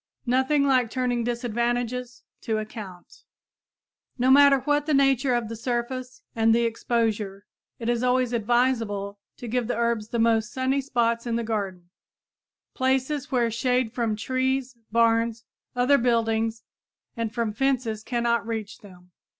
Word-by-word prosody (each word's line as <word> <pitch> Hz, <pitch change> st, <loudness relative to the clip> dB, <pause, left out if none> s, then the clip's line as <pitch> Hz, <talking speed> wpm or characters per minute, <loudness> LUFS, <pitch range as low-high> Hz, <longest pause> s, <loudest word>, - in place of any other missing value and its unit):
Nothing 265 Hz, +4 st, +2 dB
like 255 Hz, -4 st, +3 dB
turning 245 Hz, -1 st, -1 dB
disadvantages 240 Hz, +1 st, -2 dB, 0.2 s
to 220 Hz, -1 st, -1 dB
account! 210 Hz, -4 st, -9 dB, 0.9 s
No 255 Hz, +1 st, +3 dB
matter 280 Hz, -1 st, +6 dB
what 295 Hz, +1 st, 0 dB
the 305 Hz, -, +2 dB
nature 270 Hz, -2 st, +3 dB
of 240 Hz, -2 st, -1 dB
the 230 Hz, -, -6 dB
surface 250 Hz, +2 st, -4 dB
and 225 Hz, 0 st, +4 dB
the 235 Hz, -, +2 dB
exposure, 220 Hz, -4 st, -1 dB, 0.3 s
it 230 Hz, -, -6 dB
is 240 Hz, -1 st, +1 dB
always 250 Hz, -1 st, +1 dB
advisable 225 Hz, -4 st, 0 dB, 0.2 s
to 240 Hz, -, -8 dB
give 240 Hz, 0 st, -1 dB
the 245 Hz, -, -2 dB
herbs 235 Hz, -2 st, 0 dB
the 235 Hz, -, -2 dB
most 225 Hz, -1 st, +2 dB
sunny 260 Hz, +1 st, 0 dB
spots 235 Hz, -3 st, 0 dB
in 230 Hz, -, -1 dB
the 235 Hz, -, -1 dB
garden, 195 Hz, -6 st, -4 dB, 0.8 s
places 265 Hz, +2 st, 0 dB
where 240 Hz, -3 st, +1 dB
shade 250 Hz, 0 st, 0 dB
from 230 Hz, -3 st, -1 dB
trees, 260 Hz, +3 st, -1 dB, 0.2 s
barns, 230 Hz, 0 st, +2 dB, 0.3 s
other 250 Hz, +3 st, +4 dB
buildings 225 Hz, -2 st, 0 dB, 0.5 s
and 230 Hz, -2 st, -2 dB
from 230 Hz, -2 st, -2 dB
fences 245 Hz, -3 st, 0 dB
cannot 235 Hz, -2 st, 0 dB
reach 220 Hz, -2 st, -5 dB
them. 180 Hz, -3 st, -16 dB
235 Hz, 140 wpm, -25 LUFS, 225-255 Hz, 0.9 s, matter